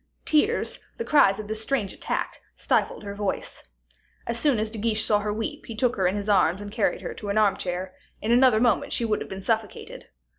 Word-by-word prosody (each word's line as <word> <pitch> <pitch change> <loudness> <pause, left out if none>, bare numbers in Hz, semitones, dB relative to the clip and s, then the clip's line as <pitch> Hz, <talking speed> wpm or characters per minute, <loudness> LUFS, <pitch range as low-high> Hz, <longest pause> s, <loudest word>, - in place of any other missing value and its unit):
Tears, 310 +10 +2 0.2
the 465 - -4
cries 200 -10 +4
of 215 -1 -7
this 215 0 -3
strange 220 -5 -1
attack, - - -4
stifled - - 0
her 200 -1 -6
voice. 200 -1 -4 0.6
As 235 0 -3
soon 285 -4 +3
as 215 0 -2
De 220 - -2
Guiche 220 0 +2
saw 210 -1 +3
her 210 0 -2
weep, 220 +1 -4
he 230 - -6
took 245 +2 +1
her 190 -2 +1
in 185 - 0
his 205 0 -4
arms 190 -3 +3
and 205 0 -7
carried 215 -1 0
her - - -5
to 205 - -7
an 200 - 0
armchair; 185 -3 0 0.3
in 220 - -2
another 245 -2 +5
moment 240 -3 +2
she 235 - +1
would 215 -2 0
have - - -6
been 190 0 -7
suffocated. 220 -2 -3
215 Hz, 220 wpm, -25 LUFS, 200-230 Hz, 0.6 s, another